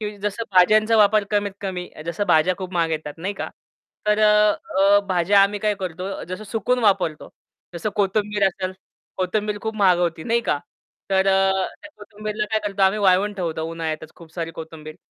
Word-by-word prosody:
की 210 -1 -5
जसं 205 +2 -3
भाज्यांचा 215 +5 +5
वापर 210 0 +4
कमीत 205 -1 0
कमी. 185 -3 -4 0.2
जसं 170 +5 -2
भाज्या 170 +2 +3
खूप 185 -1 -6
महाग 165 -2 +1
येतात 150 -2 -4
नाही 190 +5 -3
का. - - -5 0.6
तर 210 0 +3
अ, 210 -2 +4
भाज्या 185 +2 +4
आम्ही 200 +1 +1
काय 210 0 +1
करतो 185 +2 -5
जसं 185 +4 -6
सुकवून 225 +4 -1
वापरतो. 185 -6 +1 0.5
जसं 175 +5 -3
कोथिंबीर 205 0 +1
असेल 185 0 -3 0.4
कोथिंबीर 205 +3 -1
खूप 220 0 -3
महाग 190 -4 +4
होती 170 -2 -1
नाही 235 0 +1
का? 150 - -1 0.5
तर 190 0 +3
अ, 195 0 +4 0.3
त्या 300 - -11
कोथिंबीरला 210 0 -5
काय 220 - +2
करतो 195 -1 -2
आम्ही 195 +2 +4
वाळवून 200 +1 +3
ठेवतो 165 -4 -3
उन्हाळ्यातच 160 -1 -5
खूप 165 -2 -15
सारी 165 -2 -3
कोथिंबीर. 160 -1 -9
195 Hz, 175 wpm, -22 LUFS, 175-210 Hz, 0.6 s, भाज्यांचा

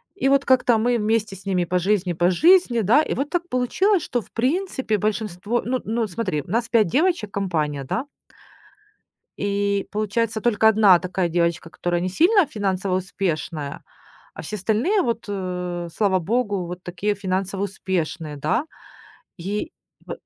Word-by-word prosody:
И 370 - 0
вот 275 0 +4
как-то 250 -3 +4
мы 240 +2 +2
вместе 215 -1 0
с 190 +1 -11
ними 185 -3 0
по 180 +2 0
жизни 185 -1 +1
по 175 +2 +2
жизни, 325 - +4
да. 230 +9 +5
И - - -2
вот 280 +2 -2
так 350 -1 -1
получилось 350 - +2
что, 245 - -2
в - - -18
принципе, 265 - 0
большинство 210 +1 -1
ну 255 +1 0
ну 225 0 -1
смотри, 185 -6 -2
нас 230 +5 0
5 225 -4 +4
девочек, 300 - +1
компания, 155 -8 -2
да. 225 - -2 1.3
И 200 0 0
получается 215 +1 -1
только 220 -1 +2
1 210 -4 +6
такая 185 0 -2
девочка, 170 -1 0
которая 175 0 -2
не 180 - -1
сильно 355 - +4
финансово 195 -7 -1
успешная, 165 -6 -3 0.5
а - - -8
все 210 - -4
остальные 230 - +1
вот, 230 -1 -2
э, 180 -3 -4
слава 195 -3 +2
богу, 205 0 -1
вот 180 +1 -7
такие 190 +4 -2
финансово 190 0 -2
успешные, 175 -6 -3
да? 235 - 0 0.7
И 205 - -4 0.3
в - - -5
205 Hz, 155 wpm, -23 LUFS, 180-235 Hz, 1.3 s, 1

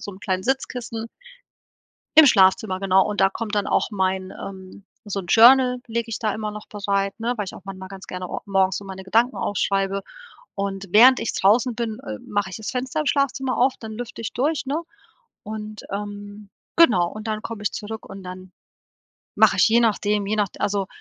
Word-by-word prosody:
so 205 - -7
'n 190 - -12
kleinen 185 -3 -2
Sitzkissen 240 -2 -3 1.1
im 315 - +10
Schlafzimmer, 190 -3 +4
genau, 190 0 +3
und 210 - -2
da 195 - +4
kommt 215 0 -4
dann 205 - 0
auch - - +1
mein 190 -1 -1
ähm, 190 0 -10 0.2
so 200 -1 -3
'n 180 - -11
Journal 250 +3 +6
lege 230 0 -3
ich - - -3
da 215 -2 -1
immer 215 -1 -4
noch 210 0 -9
bereit, 200 0 -2
ne, 235 +2 -1
weil 210 - -2
ich - - -8
auch - - -12
manchmal 190 -1 -8
ganz 195 0 -10
gerne 180 -1 -6
o - - -4
morgens 190 -2 +1
so 200 - -6
meine 190 0 -8
Gedanken 230 +6 +2
aufschreibe 195 0 -1 0.5
und 195 0 -3
während 250 +5 +7
ich - - -2
draußen 230 +5 +3
bin, 225 -2 -3
äh, 105 -1 -7
mache 205 -2 -1
ich - - -7
das 220 - -5
Fenster 260 +4 -2
im 300 - -5
Schlafzimmer 275 -2 0
auf, 255 +2 +3
dann 220 -1 -8
lüfte 235 0 -7
ich 225 - -4
durch, 285 +2 -1
ne? 295 +5 -2 0.6
Und 215 0 -7
ähm, 205 0 -7 0.3
genau 215 - +5
und 215 +1 -8
dann 215 0 -2
komme 220 -2 -7
ich 205 - 0
zurück 220 +1 -7
und 195 0 -9
dann 185 0 -9 0.8
mache - - +5
ich - - +5
je 235 +2 +5
nachdem, 210 -2 +1
je 210 +2 -1
nachde 205 -3 -2
also 200 -2 -1
210 Hz, 205 wpm, -23 LUFS, 195-230 Hz, 1.1 s, im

